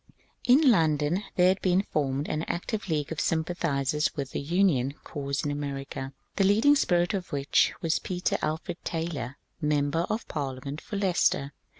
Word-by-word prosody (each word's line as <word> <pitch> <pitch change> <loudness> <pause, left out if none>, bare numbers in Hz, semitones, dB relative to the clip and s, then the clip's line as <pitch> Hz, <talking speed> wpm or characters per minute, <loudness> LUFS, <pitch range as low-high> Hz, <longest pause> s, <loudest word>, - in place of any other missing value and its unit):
In 255 +5 +7
London 160 -1 +2
there 180 0 +5
had 190 +1 +1
been 185 +1 +3
formed 145 -4 -1
an 155 - -1
active 205 +3 -3
league 150 -2 -1
of 160 - -2
sym 160 -1 +1
pathizers 150 -4 0
with 140 -3 -4
the - - -2
Union 145 -5 +2
cause 140 -2 -3
in 145 - 0
America, 140 -2 -4 0.3
the 195 - +4
leading 220 +9 +5
spirit 175 -9 +2
of 190 -2 -3
which 140 -1 +3
was 165 -1 +1
Peter 180 -1 -1
Alfred 160 +3 -3
Taylor, 150 -6 -3 0.2
Member 150 +3 +1
of 215 +2 -2
Parliament 140 0 -4
for 205 - -5
Leicester. 175 -7 +1
155 Hz, 165 wpm, -28 LUFS, 140-180 Hz, 0.3 s, In